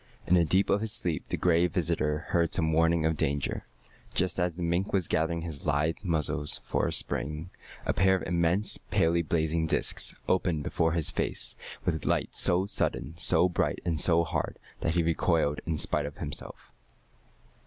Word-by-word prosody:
In - - +1
the 90 -2 +5
deep 95 +5 +2
of 100 +1 +2
his 110 -1 -3
sleep 85 -8 -3
the - - -3
Gray 85 0 +3
Visitor 85 -3 -1
heard 85 -1 +2
some 80 -3 +1
warning 80 0 +2
of 80 0 +1
danger. 70 -2 -2 0.5
Just 95 +1 0
as 90 -2 0
the 90 - -5
mink 85 +4 -1
was 95 -4 +1
gathering 80 +1 0
his 80 -2 -6
lithe 75 +3 +1
muscles 80 -4 +2
for - - -1
a - - -2
spring, 75 +5 -1 0.3
a - - 0
pair 95 +1 +3
of 95 - -3
immense, 85 +4 0
palely 85 +1 +1
blazing 80 0 0
discs - - 0
opened 90 -5 0
before 80 +2 0
his 85 -3 +1
face - - -3 0.3
with 80 -3 -1
a - - -5
light - - 0
so 90 +2 +2
sudden, 80 -6 0
so 85 +1 +5
bright, 90 - -1
and 80 -3 +1
so 85 -1 +5
hard 80 -2 -3 0.2
that 80 - -1
he 85 - +2
recoiled 80 -2 +1
in 80 -2 -1
spite 75 0 0
of 75 - -10
himself. 75 -3 -2
85 Hz, 185 wpm, -28 LUFS, 80-90 Hz, 0.5 s, the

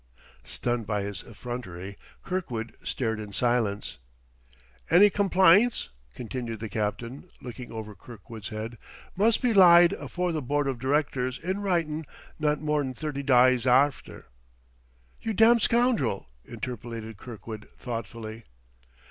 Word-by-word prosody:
Stunned 120 - -3
by 105 -2 -1
his 100 -2 -5
effrontery, 100 -5 -7 0.3
Kirkwood 125 -12 -4
stared 110 -4 -2
in 105 -1 -7
silence. 115 -2 0 0.9
"Any 200 +4 +7
complynts," 195 +3 +4 0.3
continued 120 -2 -5
the 110 0 -5
captain, 115 - -4
looking 125 0 -8
over 110 -2 -6
Kirkwood's 110 -1 -10
head, 110 +1 -6 0.4
"must 220 +6 +3
be 245 -2 +3
lyde 175 -3 +8
afore 180 0 -3
the 155 -2 -2
Board 145 +2 0
of 130 -3 -2
Directors 130 -1 0
in 185 +4 -3
writin' 165 -6 -1 0.3
not 150 -1 +1
more'n 150 -4 -1
thirty 145 0 -4
dyes 130 -2 +4
arfter 135 +3 +2 0.5
" - - -35
"You 225 - -2
damned 225 +2 +5
scoundrel!" 225 - +1 0.2
interpolated 115 -3 -6
Kirkwood 110 -1 -9
thoughtfully. 115 -1 -6
125 Hz, 125 wpm, -27 LUFS, 110-160 Hz, 0.9 s, lyde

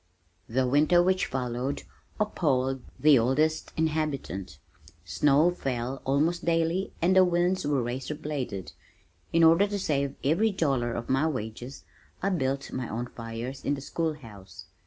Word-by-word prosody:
The 130 +3 +1
winter 155 +6 +4
which 185 +1 +1
followed 125 +1 -3 0.4
appalled 135 -11 0 0.2
the 150 -3 +6
oldest 150 +7 +1
inhabitant. 150 - -2 0.5
Snow 145 - +3
fell 130 -5 -3
almost 155 +6 +1
daily, 165 +3 0
and 185 +2 +4
the 190 - +8
winds 180 -1 +1
were 140 -4 +1
razor 130 +5 -4
bladed. 130 -11 -5 0.6
In 165 0 +4
order 165 +5 +6
to 205 0 -3
save 140 -7 -1
every 170 +11 +3
dollar 135 -10 0
of 115 0 -4
my 135 +4 +2
wages, 125 -1 -5 0.4
I 195 - 0
built 135 -6 -1
my 130 -3 -4
own 120 +3 -4
fires 115 +3 -6
in 145 - 0
the 140 - -8
school 160 +3 -2
house. 105 - -12
140 Hz, 145 wpm, -27 LUFS, 125-165 Hz, 0.6 s, the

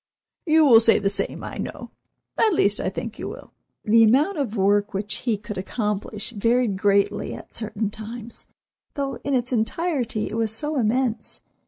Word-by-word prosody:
You 315 0 +5
will 235 -5 +8
say 225 0 +5
the 195 -1 +1
same, 200 - -1
I - - -6
know—at 435 -5 -3
least 205 -7 +2
I - - -1
think 220 +3 -6
you - - -4
will." - - -11 0.3
The 225 +1 +6
amount 285 - +3
of 235 -6 -2
work 205 +2 +2
which 200 +1 -1 0.2
he 220 - +2
could 210 -1 -6
accomplish 210 +1 -3
varied 230 0 +1
greatly 200 +1 +1
at - - -12
certain 215 -1 -3
times, 225 +2 -7 0.5
though 275 -3 -2
in 280 -1 0
its 250 0 -1
entirety 245 -1 -1
it - - -6
was 225 -1 +1
so 295 +6 -2
immense. 230 -1 -1
225 Hz, 170 wpm, -23 LUFS, 210-255 Hz, 0.5 s, will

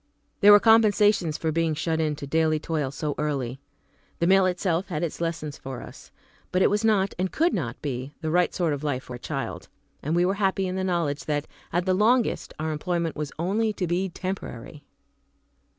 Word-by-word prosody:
There 205 0 +8
were 205 - +9
compensations 210 -7 +4
for 160 - -1
being 165 0 0
shut 160 0 -1
in 155 -1 0
to 145 - -7
daily 155 +2 +1
toil 155 -3 -2
so 145 +2 -3
early. 135 -4 -2 0.6
The 170 - 0
mill 190 +1 +5
itself 180 0 0
had 165 -3 -3
its 170 0 -4
lessons 165 -3 -3
for 130 -2 -7
us. - - -12 0.4
But 185 +1 +3
it - - +4
was 210 +2 +1
not, 200 -3 +2
and 185 0 0
could 335 +3 +2
not 125 - -3
be, 130 -1 -4
the 160 -1 -2
right 175 +1 +3
sort 170 -5 0
of 145 +1 -5
life 140 -3 -1
for 125 - -8
a - - -21
child, - - -5 0.3
and 155 +4 -1
we 175 +1 +3
were 190 - +2
happy 195 0 +1
in 185 0 -3
the 190 - -1
knowledge 170 -6 -1
that, 145 -1 -1 0.3
at 175 +1 0
the 185 - +2
longest, 225 +5 +2
our 155 +1 -2
employment 170 +1 -2
was 150 -1 -4
only 210 +6 0
to 190 - -2
be 180 +3 0
temporary. 165 -7 -6
170 Hz, 205 wpm, -25 LUFS, 150-190 Hz, 0.6 s, were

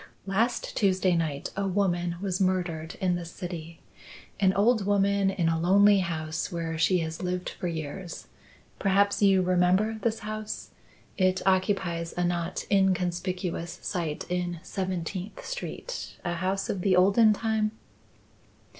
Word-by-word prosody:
"Last 225 +5 0
Tuesday 185 -3 +2
night 155 -4 -2
a 200 0 -1
woman 175 -3 0
was 190 -1 -2
murdered 175 -4 -1
in 185 -2 +1
this 170 -1 -5
city; 170 -2 -7 0.6
an 190 -2 +4
old 215 +2 +3
woman, 200 -1 +3
in 185 -4 0
a 165 0 +1
lonely 200 +4 +5
house 160 -1 -3
where 165 -2 -3
she 165 +3 +3
has 160 0 -6
lived 180 0 -2
for 180 - -5
years. 165 +2 -5 0.5
Perhaps 200 +1 +2
you 195 -2 +5
remember 185 +5 +2
this 225 -1 -1
house? 215 0 -5 0.5
It 185 0 +2
occupies 185 -3 +1
a 180 - +1
not 175 0 -1
inconspicuous 180 -2 0
site 165 -5 -3
in 175 -1 -2
Seventeenth 185 +1 -4
Street - - -5
a 175 - 0
house 190 +3 -1
of 190 - -2
the 185 0 +3
olden 200 +5 +6
time?" 215 0 0
185 Hz, 135 wpm, -27 LUFS, 175-200 Hz, 0.6 s, olden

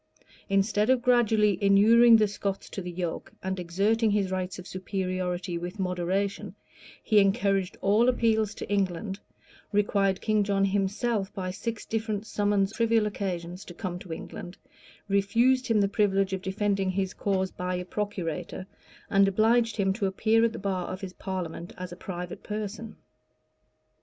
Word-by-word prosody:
Instead 205 +2 +2
of 260 -2 +3
gradually 220 -5 +3
inuring 225 +4 +7
the 215 -1 +3
Scots 200 -1 -4
to 195 - -4
the 180 - -6
yoke, 175 -1 -4
and 190 0 -2
exerting 205 +6 +1
his 200 -2 +1
rights 185 0 -3
of 185 - -9
superiority 185 -2 -3
with 175 +4 -6
moderation, 190 +2 -2 0.5
he 215 -2 +4
encouraged 195 -2 +1
all 215 +5 +4
appeals 220 -4 +1
to - - -6
England; 195 0 -1 0.5
required 200 -2 +2
King 215 -1 +1
John 195 -1 +1
himself, 200 +2 0
by 185 -2 -3
six 225 +3 -5
different 220 -2 -2
summons 205 -2 +1
on - - -10
trivial 230 -2 +3
occasions, 180 -3 -4
to 175 - -10
come 180 -2 -4
to 185 - -12
London;[] 175 +2 -7 0.5
refused 230 +6 +2
him 225 -3 +3
the 200 - +3
privilege 195 -1 +1
of 190 - -2
defending 195 0 0
his 190 0 -1
cause 190 -2 -1
by 180 0 -3
a 180 0 -4
procurator; 185 -3 -4 0.5
and 195 -1 +5
obliged 225 +3 +2
him 195 -2 +2
to 200 -1 -1
appear 220 +4 +2
at 230 - +3
the - - -7
bar 190 -3 -2
of 185 - -6
his 190 -2 -6
parliament 180 -3 -5
as 180 -1 -6
a - - -7
private 180 -1 -6
person. 215 +1 -5
195 Hz, 160 wpm, -27 LUFS, 185-215 Hz, 0.5 s, inuring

